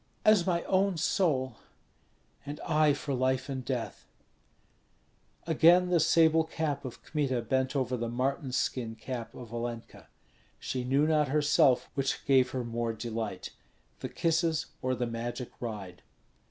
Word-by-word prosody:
"As 210 -5 +5
my 170 -2 +1
own 190 -1 +1
soul." 140 - +1 0.9
"And 145 +1 -7
I 155 -1 +3
for 145 0 -4
life 130 +1 0
and 130 -1 -3
death." 125 -2 -4 1.4
Again 170 +3 +5
the 175 -1 +3
sable 160 0 +4
cap 150 -3 -3
of 125 - -8
Kmita 135 -6 -1
bent 130 +3 0
over 130 -2 0
the 120 -1 -3
marten 130 +3 -1
skin 120 -3 -1
cap 115 0 -6
of 120 -2 -10
Olenka. 120 -1 -6 0.5
She 130 -1 -3
knew 135 +4 +2
not 155 -2 +2
herself 145 -2 +3
which 135 0 -2
gave 130 -2 +4
her 130 -1 -3
more 115 0 -2
delight, 110 -1 -5 0.5
the - - -5
kisses 165 -1 +1 0.2
or 130 0 0
the 120 0 -1
magic 120 +2 -5
ride. 105 -7 -6
130 Hz, 140 wpm, -30 LUFS, 120-155 Hz, 1.4 s, As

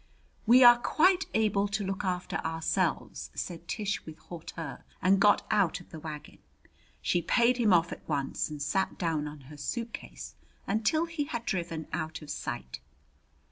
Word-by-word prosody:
"We 250 +3 +8
are 240 0 +9
quite 365 +8 +3
able 210 -2 +2
to 200 0 -2
look 195 +1 -3
after 180 -1 -2
ourselves," 160 0 -1
said 170 -1 -5
Tish 205 +1 -2
with 155 0 -10
hauteur, 165 -1 -8 0.2
and 190 +2 +4
got 205 +1 +5
out 195 -4 +2
of 175 - -16
the 160 - -7
wagon. 150 -1 -8 0.6
She 175 - +2
paid 240 +8 +3
him 225 -4 +3
off 170 -1 +4
at - - -9
once 140 -1 -1
and 150 -1 -6
sat 190 +7 0
down 160 -4 -1
on 150 -1 -9
her 145 +3 -12
suitcase 70 - -5 0.3
until 225 +11 +1
he 330 -3 -3
had 235 -4 -4
driven 170 -4 -2
out 160 -1 -3
of 150 - -7
sight. 65 0 -5
180 Hz, 165 wpm, -30 LUFS, 155-220 Hz, 0.6 s, are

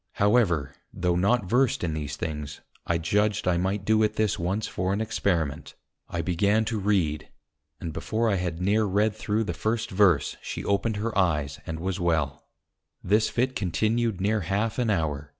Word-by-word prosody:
However, 100 - +2 0.2
tho' 90 0 0
not 100 +5 +2
versed 125 +2 +2
in 80 -3 -1
these 75 -2 -4
things, 75 -3 -5 0.3
I 85 - +2
judged 105 +5 0
I 90 -1 +3
might 95 +2 -1
do 110 +1 +3
it 105 - +1
this 110 -2 0
once 95 +5 -1
for 90 +2 -2
an 100 - -1
Experiment. 90 -9 -1 0.3
I - - -2
began 100 +5 +2
to 110 -1 -2
read, 95 -7 0 0.5
and 85 -3 -5
before 115 +7 -1
I 100 -3 +2
had 90 -2 -3
near 105 +4 +2
read 105 +2 +1
through 110 0 -1
the 90 - -3
first 110 +6 -2
Verse, 95 -7 +3
she - - -5
opened 100 +2 +1
her 110 +2 -3
Eyes, 75 -7 +1
and 80 -1 -4
was 95 +2 -2
well; 80 -6 -1 0.6
this 105 +4 +3
Fit 130 +2 0
continued 110 +3 0
near 105 +3 +1
half 100 +7 -1
an 120 -3 +1
hour. 75 -7 -1
100 Hz, 180 wpm, -26 LUFS, 85-110 Hz, 0.6 s, I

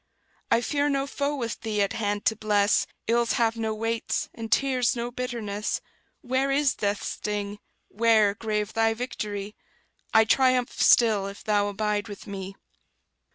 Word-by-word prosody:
I 230 - +3
fear 290 +3 0
no 275 -1 0
foe 285 +1 -2
with 230 -5 -4
Thee 210 -2 0
at 200 - -2
hand 205 -1 -2
to 220 - +3
bless; 210 -1 +2 0.2
Ills 235 0 +2
have 230 -1 +2
no 225 -1 -2
weights, 225 +1 -2
and 225 -1 -7
tears 255 -3 +2
no 240 0 -3
bitterness; 230 -5 -3 0.4
Where 260 0 0
is 275 0 +2
death's 205 0 -2
sting? 205 -1 -4 0.3
where, 220 -2 +3
grave 210 0 -2
thy 225 0 +2
victory? 210 -4 -5 0.6
I 220 0 +6
triumph 255 +1 +3
still, 215 -5 +5
if 200 0 -9
Thou 205 -2 +2
abide 210 +1 -1
with 205 -2 -9
me. 195 -2 -7
220 Hz, 155 wpm, -26 LUFS, 205-245 Hz, 0.6 s, I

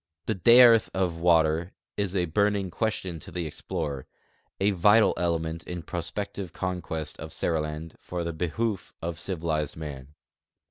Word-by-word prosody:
The 110 - 0
dearth 115 +2 +7
of 90 -3 0
water 85 0 +3 0.2
is 100 -2 -1
a 90 -2 +2
burning 100 +2 +1
ques 110 +3 0
tion 85 -3 -5
to - - -11
the 90 -2 -3
explorer, 70 -2 -4 0.5
a 100 +2 +3
vital 105 +4 +5
element 85 -1 -1
in 90 -2 -5
prospective 90 +2 -4
conquest 90 -4 -4
of 80 0 -7
Seriland 75 0 -2
for 90 -1 -4
the 85 0 -3
behoof 95 +6 -2
of 85 0 -3
civilized 80 -6 -2
man. 75 -2 -8
85 Hz, 145 wpm, -27 LUFS, 80-95 Hz, 0.5 s, dearth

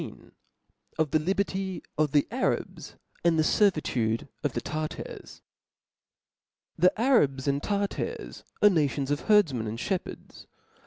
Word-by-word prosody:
Of 155 -3 0
the 155 - +3
Liberty 190 +1 -2
of 155 -2 +1
the 145 0 +3
Arabs, - - -2 0.3
and 170 -1 +3
the 155 - +4
Ser 205 +6 +4
vitude 120 - -2 0.2
of 145 - 0
the - - -1
Tartars. 155 +5 -6 1.4
'T^'H 180 - +6
E - - +8
Arabs 150 - +2
and 140 0 +1
Tartars 200 +2 -3 0.2
are 210 - +9
nations 145 -4 0
of 145 - -2
herdf 210 -1 +6
■■' - - -7
men 110 -3 -3
and 110 +2 -5
(hepherds. 190 +6 -5
155 Hz, 145 wpm, -27 LUFS, 140-195 Hz, 1.4 s, are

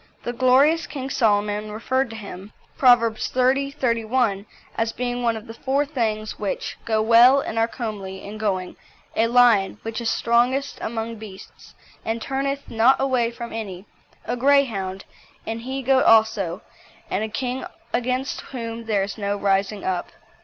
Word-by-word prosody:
The 240 - -3
glorious 270 +7 +4
King 270 -2 -5
Solomon 210 -2 +1
referred 260 +4 -1
to 225 - -8
him 200 -1 -9 0.2
(Proverbs 235 -4 +4
xxx. 270 +2 +1
31) 230 -5 0 0.3
as 225 0 0
being 245 0 -3
one 230 -2 +1
of 220 - -10
the 225 - -9
four 270 +4 0
things 220 -6 -2
which 205 -2 -3
"go 220 -1 +1
well 235 +4 +7
and 225 -4 -3
are 225 - +3
comely 205 -6 -6
in 210 +2 -8
going 190 -4 -2 0.4
a 225 - +3
lion, 235 -5 +4
which 225 +1 -4
is 235 - 0
strongest 250 +4 +1
among 225 0 -4
beasts, 205 -3 -12 0.3
and 225 +1 -2
turneth 275 +3 -3
not 230 +4 +3
away 255 -3 +1
from 235 0 -8
any; 200 -4 -6 0.4
a 245 - -2
Greyhound; 235 -8 +1 0.4
an 225 +1 -4
he 265 +3 -5
goat 265 +1 +3
also; 220 -5 +3 0.5
and 200 - 0
a 220 - -3
king 250 +3 -3 0.3
against 255 +2 -1
whom 230 -2 -6
there 210 -3 +1
is 200 +2 -6
no 200 0 -1
rising 200 +1 0
up." 185 -2 -2
230 Hz, 160 wpm, -23 LUFS, 215-255 Hz, 0.5 s, well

